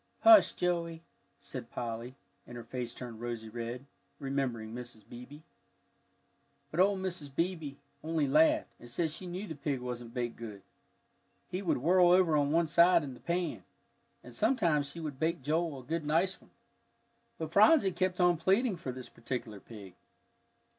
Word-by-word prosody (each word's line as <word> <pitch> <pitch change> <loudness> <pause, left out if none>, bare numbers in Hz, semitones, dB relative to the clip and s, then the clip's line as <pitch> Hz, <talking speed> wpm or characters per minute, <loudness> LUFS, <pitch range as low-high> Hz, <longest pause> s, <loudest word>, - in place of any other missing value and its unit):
"Hush, 335 -2 +8
Joey," 170 -2 -2 0.4
said - - -8
Polly, 120 +1 -5 0.3
and 120 - -9
her 120 - -7
face 120 +1 -5
turned 120 -2 -9
rosy 120 -2 -5
red, 120 +3 -6 0.3
remembering 130 -6 -3
Mrs. 120 -3 -9
Beebe. 125 +6 -11 1.3
But 155 - -3
old 195 +1 +4
Mrs. 175 -6 -4
Beebe 165 -4 -2 0.3
only 160 -1 0
laughed, 315 - +3
and 120 - -13
said 160 +5 -1
she 180 +4 -5
knew 180 +4 -5
the 165 - -6
pig 140 -2 -3
wasn't 120 -1 -6
baked 120 -1 -3
good, 105 -4 -8 0.9
he 185 +1 -2
would 185 - +1
whirl 175 +6 +4
over 180 -3 +5
on 145 -1 +2
one 165 +1 +3
side 170 +1 +5
in 135 -3 -6
the 125 - -13
pan. 175 0 -2 0.6
And - - -12
sometime 170 - +2
she 145 +4 -6
would 150 -5 -6
bake 165 -1 -1
Joel 155 -1 -1
a - - -17
good 160 +4 -3
nice 165 +6 +1
one. - - -21 0.9
But 160 -1 -5
Phronsie 210 - +6
kept 185 0 -1
on 175 -1 +4
pleading 195 +5 +2
for 135 -6 -5
this 125 0 -8
particular 115 -3 -6
pig. 100 -4 -12
150 Hz, 165 wpm, -31 LUFS, 125-175 Hz, 1.3 s, Hush